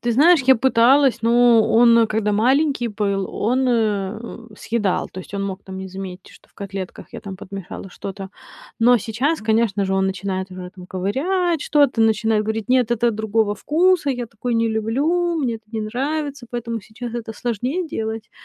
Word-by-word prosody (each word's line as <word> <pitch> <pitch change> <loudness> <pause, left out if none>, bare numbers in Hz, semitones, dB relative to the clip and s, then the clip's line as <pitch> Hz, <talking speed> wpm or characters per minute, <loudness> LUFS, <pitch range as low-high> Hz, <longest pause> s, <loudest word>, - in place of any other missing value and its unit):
Ты 240 0 0
знаешь, 315 +6 +5
я 265 - +8
пыталась, 260 +2 +4
но 235 0 +5
он, 230 0 +6
когда 215 -1 0
маленький 260 +4 +2
был, 200 -2 -1
он, 255 +4 +1
э, 225 0 -2
съедал. 210 -5 -1
То 185 - -6
есть 195 - -11
он 200 - -2
мог 195 -1 -5
там 190 -1 -9
не 190 0 -6
заметить, 190 0 -8
что - - -20
в - - -35
котлетках 195 -2 -7
я - - -7
там 195 -2 -8
подмешала 195 0 -8
что-то. 195 +1 -7 0.5
Но 245 +2 +5
сейчас, 250 - -1
конечно 220 -2 +1
же, 190 - -1
он 190 0 +2
начинает 190 0 -3
уже 185 -1 -8
там 180 -1 -11
ковырять 305 - -1
что-то, 285 -6 +2
начинает 220 -1 +2
говорить: 220 +1 -3
"Нет, 250 -2 +3
это 240 0 +2
другого 220 -1 0
вкуса, 325 - +2
я 245 -2 -3
такое 235 +2 -4
не 230 0 +2
люблю, 290 +11 0
мне 250 -7 -1
это 220 - -19
не 220 - -2
нравится". 275 +4 -3
Поэтому 235 -1 -4
сейчас 225 +4 -8
это 230 -2 -5
сложнее 250 - -2
делать. 220 -4 -5
225 Hz, 180 wpm, -21 LUFS, 200-250 Hz, 0.5 s, я